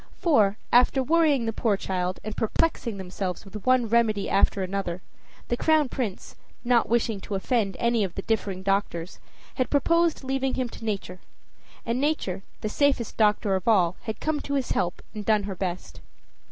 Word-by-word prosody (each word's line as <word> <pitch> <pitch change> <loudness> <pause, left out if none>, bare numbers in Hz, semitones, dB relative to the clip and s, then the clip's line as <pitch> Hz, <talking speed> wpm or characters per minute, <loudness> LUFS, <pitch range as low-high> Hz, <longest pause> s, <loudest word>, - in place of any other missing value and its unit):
For, 215 - +3 0.2
after 250 +2 +5
worrying 300 -4 +3
the 225 - -1
poor 215 -2 +1
child 185 -1 -2
and 215 0 -5
perplexing 230 -1 0
themselves 185 +1 -4
with 205 +4 -9
one 255 -2 +4
remedy 220 -3 +1
after 195 0 +2
another, 185 -2 -3 0.4
the 240 - 0
Crown 310 +1 +3
Prince, 230 -9 -4 0.3
not 240 -1 +3
wishing 225 -3 +1
to 205 - -4
offend 195 -1 0
any 235 -2 +2
of 185 -3 -4
the 195 - -4
differing 200 -4 -2
doctors, 195 -3 -1 0.4
had 255 - 0
proposed 335 +2 +2
leaving 270 0 -1
him 255 -2 -1
to 230 - -11
Nature; 195 -4 -3 0.7
and 235 +3 -1
Nature, 280 - -1 0.2
the - - -2
safest 270 0 +1
doctor 210 -1 +2
of 190 +2 -4
all, 185 -6 +4
had 220 -3 -4
come 310 -1 -1
to 280 - -3
his 270 -3 -1
help 175 - -1
and 210 -2 -5
done 215 -1 +2
her 200 -1 -4
best. 180 -1 -5
220 Hz, 175 wpm, -26 LUFS, 195-255 Hz, 0.7 s, after